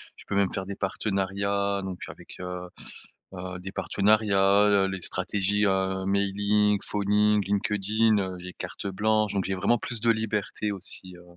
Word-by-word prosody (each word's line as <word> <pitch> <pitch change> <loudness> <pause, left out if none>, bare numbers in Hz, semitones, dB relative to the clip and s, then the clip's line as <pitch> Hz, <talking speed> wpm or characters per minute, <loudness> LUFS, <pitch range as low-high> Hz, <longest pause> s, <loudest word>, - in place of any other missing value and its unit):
je - - -13
peux 100 - -2
même 100 -1 +2
faire 95 - -3
des 100 - -5
partenariats, 100 0 -1
donc 95 -2 -5
avec, - - -12
heu 90 0 -5 0.7
heu, 90 0 -6
des 95 +1 -7
partenariats, 100 -1 +3
le 100 -1 +4
les 95 -1 -5
stratégies, 105 +1 +1
heu, 95 -1 0
mailing, 100 +1 +2
phoning, 105 0 +2
LinkedIn, 105 +2 +1
heu, 95 -2 -3
j'ai 90 0 -8
carte - - -6
blanche, 105 +1 +1
donc 95 - 0
j'ai 95 - -1
vraiment 100 +6 +2
plus 120 -1 -5
de 115 +1 +3
liberté 105 -1 -1
aussi, 95 -1 -3
heu, 90 - -15
100 Hz, 165 wpm, -27 LUFS, 95-105 Hz, 0.7 s, le